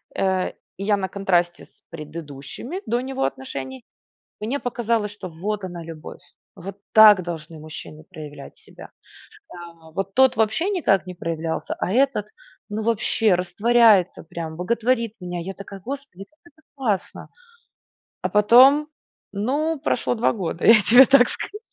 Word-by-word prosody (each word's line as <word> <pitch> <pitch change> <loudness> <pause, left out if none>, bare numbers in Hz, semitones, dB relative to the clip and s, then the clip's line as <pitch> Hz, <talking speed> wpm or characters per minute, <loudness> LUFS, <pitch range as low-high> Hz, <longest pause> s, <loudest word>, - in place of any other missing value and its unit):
Э, 190 -1 0 0.3
и 195 - -6
я 205 0 +2
на 190 -1 -2
контрасте 175 -3 0
с - - -30
предыдущими 155 - -8
до 240 +2 -1
него 260 - -2
отношений, 130 -1 -6 0.6
мне 235 +7 -2
показалось, 230 -5 -2
что 185 -3 -8
вот 200 +5 -4
она 175 -2 -7
любовь, 160 -2 -10 0.3
вот 195 +3 -9
так 215 -3 +8
должны 165 -2 -7
мужчины 155 0 -10
проявлять 145 -2 -10
себя. - - -15 0.6
Да. 170 -2 -13
Вот 195 +4 -4
тот 260 -2 +4
вообще 225 - +1
никак 320 - +1
не 180 - -6
проявлялся, 165 -1 -4
а - - -2
этот, 255 -3 +1 0.4
ну 215 +1 -4
вообще 225 -1 +1
растворяется 205 +2 +3
прям, 165 -1 -7
боготворит 230 +5 0
меня. 180 -1 -5
Я 190 +3 -6
такая, 200 0 -10
Господи, 265 -6 -8
как 305 +9 -38
это 315 - -28
классно. 225 -8 -3 0.9
А - - 0
потом, 255 +8 +6 0.4
ну 285 +9 -1
прошло 250 -4 -1
2 230 - +1
года. 175 -5 -4
Я 225 -1 +8
тебе 245 +7 +7
так 265 -2 +5
скажу. 420 - -6
200 Hz, 145 wpm, -22 LUFS, 170-235 Hz, 0.9 s, так